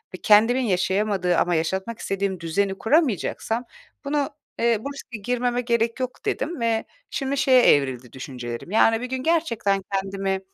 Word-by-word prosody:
ve - - -7
kendimin 225 +5 +5
yaşayamadığı 190 -3 +1
ama 175 -1 +2
yaşatmak 190 +7 -2
istediğim 195 -1 -2
düzeni 190 +4 -1
kuramayacaksam 235 - +1 0.4
bunu, 285 0 0 0.3
eee, 235 -1 +3
bu 280 - -4
riske 245 -4 -8
girmeme 245 +3 -1
gerek 235 0 0
yok, 255 0 -5
dedim 315 +2 -2
ve 225 -1 +1 0.2
şimdi 275 0 -2
şeye 260 -2 +5
evrildi 130 - +2
düşüncelerim. 125 +2 -7
Yani, 225 +1 +4
bir 250 - -3
gün 260 0 -3
gerçekten 230 -12 +1
kendimi 195 0 -1
220 Hz, 150 wpm, -24 LUFS, 190-250 Hz, 0.4 s, kendimin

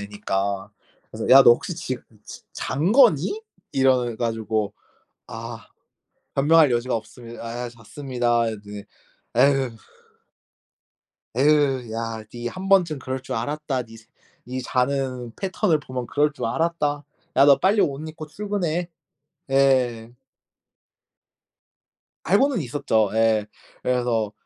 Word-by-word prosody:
애니까 100 -1 -3 0.4
그래서 - - -5
"야 135 +1 +10
너 - - +8
혹시 160 +7 -3
지금 130 -5 -5 0.2
즈 - - -10
잔 155 +8 -1
거니?" 245 - +4 0.3
이래 130 -3 +2
가지고 110 -3 -2 0.5
"아 115 0 -8 0.7
변명할 150 0 +5
여지가 120 +1 0
없습니다. 115 +2 -8
아 120 +1 -4
잤습니다." 120 0 -1
이랬더니 105 -2 -7 0.5
"에휴" 135 -3 +3 1.7
"에휴 135 -4 +2
야 115 -1 -4
니 120 0 -4
1 185 +6 -7
번쯤 175 -6 +4
그럴 130 0 -4
줄 - - -5
알았다. 135 +1 -2
니 115 -1 -14
스 110 - -19 0.4
니 130 +1 -4
자는 125 -1 -1
패턴을 190 -4 0
보면 130 -4 -6
그럴 150 +1 +1
줄 125 -5 -4
알았다. 150 +1 -1 0.3
야 140 - +7
너 140 -2 +7
빨리 200 +3 +3
옷 140 0 0
입고 155 0 -8
출근해." 180 -2 -2 0.6
예. 130 -4 +2 2.1
알고는 230 - +3
있었죠. 115 -6 0
예. 110 -1 +2 0.4
그래서 120 -4 0
130 Hz, 225 characters per minute, -23 LUFS, 115-150 Hz, 2.1 s, 야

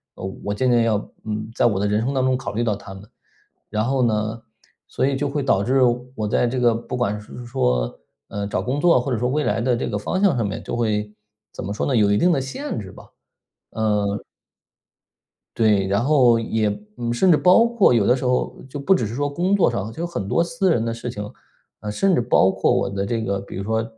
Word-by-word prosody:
呃， - - -10 0.2
我 100 - -2
渐 130 +5 0
渐 120 -1 +4
要， 110 -2 +2 0.3
嗯， 110 0 -4
在 - - +2
我 110 -5 +2
的 100 - 0
人 105 +1 +1
生 130 +4 -1
当 130 -1 +1
中 130 -1 +2
考 135 - -6
虑 115 +3 -1
到 110 -3 0
他 100 -1 -10
们。 95 +1 -11 0.7
然 110 +1 -1
后 130 +1 +1
呢， 110 0 -1 0.5
所 - - -1
以 135 0 +1
就 140 +1 -1
会 145 0 -2
导 100 -7 +2
致 130 +4 +2 0.4
我 110 -3 -2
在 115 +3 +1
这 125 +2 -2
个 120 -1 +4
不 115 +2 -5
管 105 -4 -1
是 - - -12
是 125 - -8
说， 60 - -1 0.3
呃， 100 0 -4
找 - - -2
工 135 +3 -2
作 170 -7 +5
或 135 +2 -3
者 120 - 0
说 125 - 0
未 150 +3 0
来 110 -2 0
的 125 0 +1
这 - - -2
个 - - -3
方 185 - -2
向 200 -8 +4
上 115 -4 0
面 105 +3 -5
就 - - -4
会 105 -3 -1 0.4
怎 - - -7
么 100 - -4
说 105 - -2
呢， 135 - 0
有 105 -3 +3
一 105 - +3
定 180 +8 +3
的 140 -5 +1
限 215 - -5
制 95 -3 -8
吧， - - -15 0.7
嗯。 105 -2 0 1.3
对， 105 -4 +3
然 100 +3 +1
后 125 -5 +4
也 110 -1 0 0.3
嗯， 120 -1 -2
甚 185 +10 +3
至 170 - +7
包 185 +8 +5
括 235 - +3
有 110 -4 +2
的 125 - +5
时 130 - -5
候 125 0 -1
就 145 - -6
不 190 +8 +3
只 120 - -1
是 110 - -5
说 145 +2 -1
工 175 +7 +1
作 200 - +3
上， 100 +3 -3
就 160 - -7
有 170 - -1
很 100 - -4
多 170 +12 +1
私 170 +2 0
人 115 -8 +1
的 115 0 -2
事 115 +1 -6
情。 105 -3 -6 0.5
啊， 105 - -5
甚 190 - +1
至 - - +3
包 95 -4 +3
括 - - +1
我 - - +1
的 100 0 -3
这 115 +2 -2
个 100 -2 -1
比 100 - -9
如 95 - -4
说 110 +2 0
115 Hz, 270 characters per minute, -22 LUFS, 105-135 Hz, 1.3 s, 至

